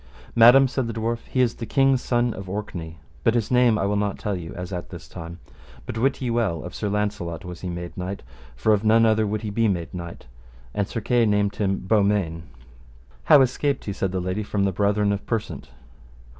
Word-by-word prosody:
Madam, 120 +4 +8
said 130 -1 -2
the 115 - -4
dwarf, 115 +1 -3
he 130 - 0
is 120 -2 +2
the 115 - -6
king's 135 -2 +3
son 120 -1 +1
of 95 -1 -8
Orkney, 85 -5 -5 0.3
but 115 - +3
his 115 -1 0
name 125 -3 +4
I 100 - 0
will 100 +1 0
not 100 -1 -1
tell 105 -2 -2
you 85 -3 -7
as 90 +1 -6
at 90 -1 -5
this - - -10
time; 85 +1 -8 0.5
but - - -5
wit 130 +4 +1
ye 120 - -1
well, 110 -9 0
of 90 - -8
Sir 105 - -3
Launcelot 100 -5 -2
was 90 -1 -8
he 90 - -4
made 85 0 -6
knight, 95 +2 -5 0.3
for 110 - +2
of 105 0 +1
none 115 +1 +5
other 110 -1 +3
would 105 +1 -3
he 105 - -3
be 115 +2 +2
made 85 -5 -2
knight, 85 -1 -7 0.5
and 100 - -1
Sir 115 - -4
Kay 120 +1 +2
named 105 -1 +1
him 95 -2 0
Beaumains. 100 -6 +2 0.8
How 140 - +7
escaped 135 +2 0
he, 100 - -3
said 95 -2 -2
the 95 - -1
lady, 90 +3 -2
from 100 -1 -1
the 100 - +2
brethren 100 +2 +1
of 100 0 -2
Persant? 115 -2 -3
105 Hz, 220 wpm, -24 LUFS, 95-115 Hz, 0.8 s, Madam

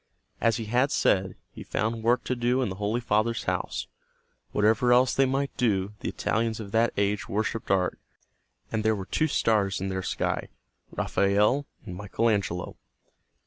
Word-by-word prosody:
As 115 -1 +3
he 115 - -4
had 125 +6 +2
said, 95 -1 +2 0.2
he - - -11
found 110 +1 -2
work 120 +2 +2
to 130 - -1
do 125 +2 +1
in 120 - -1
the 95 - -6
Holy 105 +4 0
Father's 115 0 0
house. - - -2 0.7
Whatever 110 +4 +3
else 125 -1 +5
they 135 0 +3
might 135 +1 -1
do, 105 -5 +1
the - - -3
Italians 115 0 -1
of 100 -3 -7
that 115 +2 +3
age 100 0 0
worshiped 110 +2 -2
art, 95 -2 +1 0.7
and 110 -1 -1
there 110 0 +3
were 95 -2 -5
two 155 +10 +1
stars 105 -8 +1
in 95 +1 -3
their 95 0 -2
sky, - - -2 0.4
Raphael 105 +8 +2 0.2
and 90 - -7
Michael 105 +4 0
Angelo. 95 -4 -2
110 Hz, 170 wpm, -27 LUFS, 100-120 Hz, 0.7 s, else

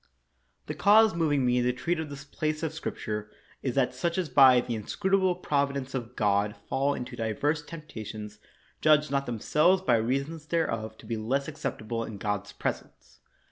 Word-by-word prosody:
The - - -4
cause 215 +1 +5
moving 150 -5 +1
me 125 0 +3
to 125 +1 +2
treat 165 +7 -2
of 160 -2 -4
this 140 -1 -8
place 155 +2 -3
of 160 - -2
Scripture 105 -1 -4 0.3
is 130 -3 -2
that 135 -2 +2
such 170 +8 -1
as 180 -5 -1
by 130 -3 +7
the 120 - -3
inscrutable 190 - +1
provi 140 -5 0
dence 135 0 -5
of 125 -2 -5
God 105 0 +1
fall 140 +2 +1
into 125 0 -6
divers 120 +7 -1
temptations 110 -10 -8 0.4
judge 150 -1 +4
not 140 0 0
themselves 155 - +2
by 120 -10 +4
reason 135 +8 -1
thereof 115 -10 -1
to - - -15
be 115 +1 -3
less 135 +6 -1
acceptable 120 -7 -4
in 110 -2 -7
God's 105 0 -3
presence. - - -6
135 Hz, 175 wpm, -28 LUFS, 115-155 Hz, 0.4 s, by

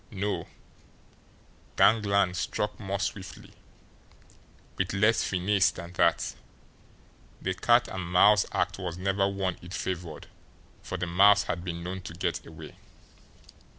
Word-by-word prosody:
No; 100 0 -3 1.3
gangland 100 -4 +3
struck 95 +3 -3
more 100 -1 -3
swiftly, 95 -1 -6 1.2
with 95 0 -2
less 105 +4 +3
finesse 95 +1 +2
than 85 0 -9
that 85 -1 +1 1.1
the 95 - -2
"cat 120 +6 +3
and 90 -2 -6
mouse" 105 +3 +5
act - - -1
was 90 -3 -4
never 95 +1 +1
one 95 -2 -2
it 90 +1 -8
favoured, 85 -3 -5 0.6
for 95 - -5
the 90 - -2
mouse 100 +4 +5
had 85 +1 -4
been 85 -1 -5
known 95 +2 -5
to 85 -2 -9
get 85 - -2
away. - - -11
95 Hz, 125 wpm, -28 LUFS, 90-100 Hz, 1.3 s, mouse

